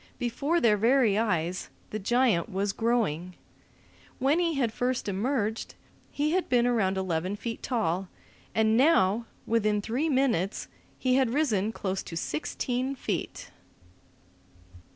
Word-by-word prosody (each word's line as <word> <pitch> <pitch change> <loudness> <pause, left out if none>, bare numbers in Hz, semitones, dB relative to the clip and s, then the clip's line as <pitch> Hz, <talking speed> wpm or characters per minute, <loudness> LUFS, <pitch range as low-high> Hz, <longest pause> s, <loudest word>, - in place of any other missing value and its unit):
Before 275 +7 0
their 220 -8 +4
very 230 -1 +3
eyes 185 -5 -1 0.2
the 215 - -3
giant 235 -2 +2
was 195 0 -1
growing. 185 -7 0 0.8
When 275 +5 +2
he 335 -2 +1
had 240 -5 0
first 250 -1 -1
emerged, 220 +2 -1 0.3
he 295 +1 -1
had 365 +1 0
been 245 -2 +3
around 205 -6 +1
eleven 185 0 -1
feet 230 +2 -5
tall, 195 -7 -1 0.5
and 220 0 +3
now, 230 - +3 0.2
within 215 -2 +1
three 245 +10 -1
minutes, 245 - +1 0.3
he 255 0 +2
had 265 -3 +3
risen 220 -9 +1
close 190 -3 -3
to 165 - -7
sixteen 250 - -2
feet. - - -4
225 Hz, 130 wpm, -28 LUFS, 195-255 Hz, 0.8 s, their